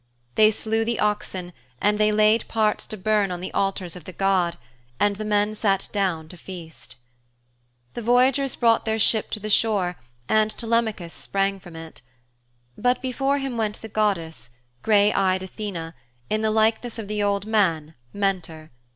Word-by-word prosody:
They 215 0 +6
slew 220 +1 -1
the 230 0 -2
oxen 190 -4 -2 0.3
and 210 +1 +2
they 215 0 +4
laid 215 +1 +3
parts 215 -2 0
to 215 - -6
burn 210 0 +1
on 180 -1 -4
the 185 - -6
altars 195 -3 -1
of 180 - -11
the - - -7
god, 185 -2 +1 0.4
and 205 -1 +2
the 215 - -4
men 210 0 +1
sat 195 -3 0
down 185 -6 -1
to 180 - -11
feast. 170 -3 -10 1.0
The 240 - -5
voyagers 250 +3 +3
brought 230 -2 +3
their 220 0 0
ship 220 0 +2
to 215 - -4
the 215 - -5
shore 200 -5 +2 0.3
and 215 +4 +3
Telemachus 220 -7 -1
sprang 195 0 -1
from 175 -2 -13
it. 160 -3 -10 0.7
But 250 +1 +1
before 270 +2 0
him 270 -3 -3
went 215 -1 -1
the 225 - -7
goddess, 180 - -1 0.3
grey 210 -1 +4
eyed 190 -1 +1
Athene, 185 -4 -6 0.4
in 215 - +1
the 220 - +1
likeness 220 +2 +1
of 220 -3 -6
the 210 0 -2
old 200 -1 0
man, 170 -8 +1 0.2
Mentor. 180 -6 -2
210 Hz, 170 wpm, -24 LUFS, 185-220 Hz, 1.0 s, They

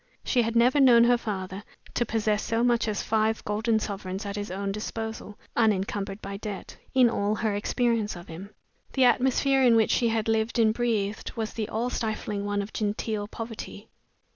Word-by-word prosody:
She 250 - +2
had 230 0 -2
never 245 +5 +4
known 245 -4 +7
her 245 +1 +5
father 195 -2 -5 0.3
to 240 - 0
possess 215 -1 0
so 230 +1 0
much 240 -2 +2
as 210 -2 -1
five 220 0 0
golden 220 +2 +1
sovereigns 195 -1 -4
at 200 0 -4
his 205 0 -4
own 195 +2 -3
disposal 220 0 -5 0.2
(unencumbered 200 -2 0
by 200 0 -5
debt) 205 -2 -7 0.2
in 255 -2 +6
all 210 -2 0
her 215 -1 -1
experience 220 +1 0
of 175 0 -10
him. 175 +5 -9 0.4
The 265 - +3
atmosphere 265 +2 +3
in 245 -3 +6
which 225 -1 +3
she 235 - +2
had 225 -1 0
lived 225 +1 0
and 220 -2 +4
breathed 220 -4 -1
was 220 -2 -4
the 215 -1 -3
all 235 +3 -1
stifling 215 -3 -3
one 205 0 -1
of 205 - -10
genteel 210 0 -2
poverty. 225 +1 -8
220 Hz, 185 wpm, -27 LUFS, 205-235 Hz, 0.4 s, known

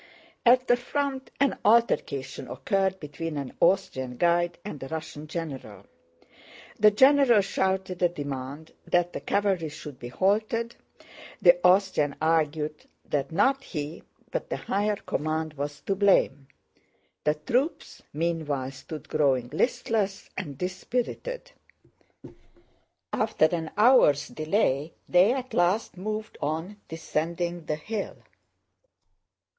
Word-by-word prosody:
At 250 +1 +6
the 245 - +5
front 270 +1 -3
an 275 0 +2
altercation 140 - +2
occurred 190 +8 0
between 155 +1 -5
an 140 -2 -5
Austrian 130 -9 +1
guide 175 +1 +2
and 150 -9 -6
a 135 - -5
Russian 155 0 -6
general. 135 - -6 0.9
The 215 - +8
general 260 0 +6
shouted 190 -1 -1
a 175 - +4
demand 145 -1 -6 0.2
that 175 0 +2
the - - -3
cavalry 195 -6 0
should 150 -3 -9
be 120 - -7
halted, 215 - 0 0.6
the 175 0 +6
Austrian 180 -6 +3
argued 155 -1 0 0.3
that 140 -2 0
not 265 +11 +2
he, 150 -1 -5 0.3
but - - -3
the - - -1
higher 205 +1 0
command, 155 -3 -2
was 145 0 -5
to 195 - -1
blame. 185 -9 +3 0.8
The 150 0 +2
troops 245 - -2
meanwhile 150 -4 -2
stood 150 +3 -9
growing 135 -5 +1
listless 200 - -1
and 150 -8 -5
dispirited. 250 - -3 1.6
After 215 -7 +2
an 160 0 -1
hour's 210 - +5
delay 155 -3 0
they 180 +5 +5
at 255 0 -3
last 180 +5 +1
moved 215 +3 -5
on, 160 +7 -3
descending 170 +1 -3
the 155 - -1
hill. 205 +7 -4
170 Hz, 120 wpm, -27 LUFS, 150-205 Hz, 1.6 s, The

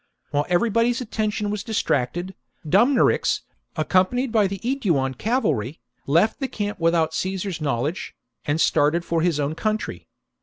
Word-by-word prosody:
While 145 +1 0
everybody's 230 +6 +2
attisntion 215 -3 -2
was 210 0 -3
distracted, 175 - -1 0.3
Dumnorix, 240 - +3 0.3
accompanied 190 +10 +1
by 215 -3 +3
the 195 +1 -4
The - - -21
fate 265 +1 -2
of 170 - +4
Aeduan 135 -1 0
cavalry, 185 - -1 0.3
left 170 - +3
the 270 - -1
camp 205 -5 -4
without 165 -1 +2
Caesar's 185 0 -3
knowledge, 145 - -2 0.3
and 155 +1 -1
started 160 +3 +2
for 165 -1 0
his 165 -3 +1
own 145 +1 0
country. 215 +6 -3
185 Hz, 150 wpm, -23 LUFS, 155-220 Hz, 0.3 s, of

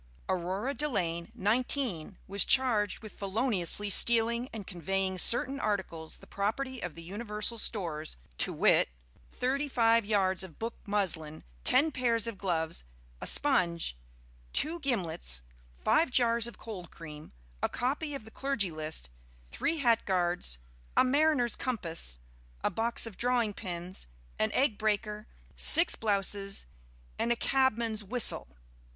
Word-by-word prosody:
Aurora 190 +8 -2
Delaine, 180 - -2
19, 210 - -1
was 200 -1 +4
charged 225 -7 +2
with 215 - -8
feloniously 205 -1 +3
stealing 235 +3 +5
and 215 -3 -7
conveying 190 +1 -2
certain 260 +7 +4
articles 190 -8 -3
the - - -16
property 250 +6 -3
of 175 - -5
the 165 - -10
Universal 210 +4 -3
Stores, 160 - -3 0.2
to - - 0
wit, - - +3 0.4
thirty 275 +3 -1
five 230 -3 +3
yards 195 -3 +1
of 175 -5 -11
book 230 +1 -4
muslin, 180 -7 0 0.2
ten 310 +4 +4
pairs 235 -4 +1
of 230 -4 -3
gloves, 165 -4 -2 0.4
a - - -3
sponge, 170 - +2 0.6
two 325 +4 0
gimlets, 165 - -2 0.3
five 270 - +2
jars 235 -2 +3
of 235 - -10
cold 185 -7 -8
cream, 150 -2 -11 0.3
a - - +1
copy 285 +4 -2
of 270 - -8
the 220 - -13
Clergy 250 -10 0
List, 155 - -4 0.4
three 325 - -1
hat 235 -6 +3
guards, 175 - 0 0.4
a - - +7
mariner's 275 -3 +2
compass, 165 - 0 0.5
a - - +1
box 230 +5 +1
of 225 -5 -8
drawing 240 -3 +1
pins, 180 - -7 0.3
an 110 - +1
egg 255 -6 +1
breaker, 210 0 -1 0.3
six 335 +3 +6
blouses, 200 -2 0 0.5
and 235 - 0
a - - +3
cabman's 235 -4 +1
whistle. 230 - +2
210 Hz, 135 wpm, -30 LUFS, 180-245 Hz, 0.6 s, a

